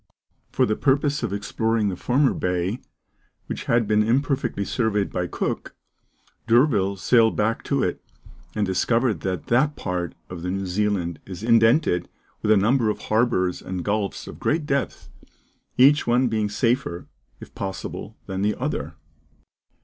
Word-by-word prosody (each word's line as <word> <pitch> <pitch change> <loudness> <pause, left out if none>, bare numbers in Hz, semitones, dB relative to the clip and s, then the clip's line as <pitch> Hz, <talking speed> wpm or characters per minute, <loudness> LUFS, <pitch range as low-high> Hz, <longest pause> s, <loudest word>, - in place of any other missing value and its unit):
For - - +2
the 110 - 0
purpose 140 +3 +1
of 115 -5 -2
exploring 110 +1 0
the 95 - -3
former 130 +8 +2
bay, 90 +5 -1 0.7
which - - -5
had 115 -1 +2
been 105 0 +3
imperfectly 125 -2 0
surveyed 105 -4 0
by 90 -1 -2
Cook, - - -4 0.7
D'Urville 115 -5 +3
sailed 110 +3 +3
back 110 +2 0
to - - +1
it, - - -2 0.5
and 105 -1 +1
discovered 115 +2 +1
that 90 +1 -3
that 145 +5 +2
part 90 -3 -3
of 90 -2 -8
New 95 +2 -2
Zealand 95 -3 -1
is 95 +1 -8
indented 115 - +3 0.3
with 105 - -1
a 110 - +6
number 115 +3 +3
of 105 - -1 0.2
harbours 95 -6 +1
and 95 -1 -5
gulfs 105 -1 -2
of - - -10
great 155 0 0
depth, 140 -2 -2 0.7
each 140 +3 +5
one 125 +2 +3
being 110 -2 0
safer, 115 -4 -1 0.3
if - - -12
possible, 95 -1 -6
than 95 0 -4
the 105 +1 +1
other. - - -3
110 Hz, 150 wpm, -23 LUFS, 95-120 Hz, 0.7 s, a